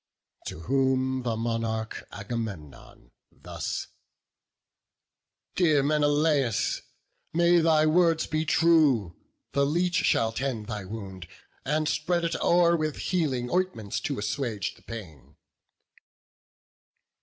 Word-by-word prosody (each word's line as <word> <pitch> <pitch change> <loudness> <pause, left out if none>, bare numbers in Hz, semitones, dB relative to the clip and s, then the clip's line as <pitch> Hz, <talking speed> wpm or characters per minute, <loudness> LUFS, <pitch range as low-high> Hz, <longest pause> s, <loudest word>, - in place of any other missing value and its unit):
To 80 - -6
whom 130 +3 +1
the 115 -3 -2
monarch 115 -1 -3
Agamemnon 100 - -7 0.2
thus: - - -5 1.7
"Dear 155 -6 +3
Menelaus, 145 -4 +2 0.5
may 170 +1 +4
thy 160 -1 +4
words 165 0 +3
be 155 0 -1
true! 150 - +3 0.4
The 140 - +2
leech 175 +5 +1
shall 115 0 +2
tend 120 -3 -3
thy 105 -3 -5
wound, 95 -4 -8 0.4
and 155 +2 0
spread 170 +3 0
it 165 - -1
o'er 170 0 +4
With 155 -2 -1
healing 135 -9 -1
ointments 180 - -1
to - - -3
assuage 105 +1 -2
the - - -21
pain." 90 - -10
135 Hz, 105 wpm, -27 LUFS, 110-160 Hz, 1.7 s, may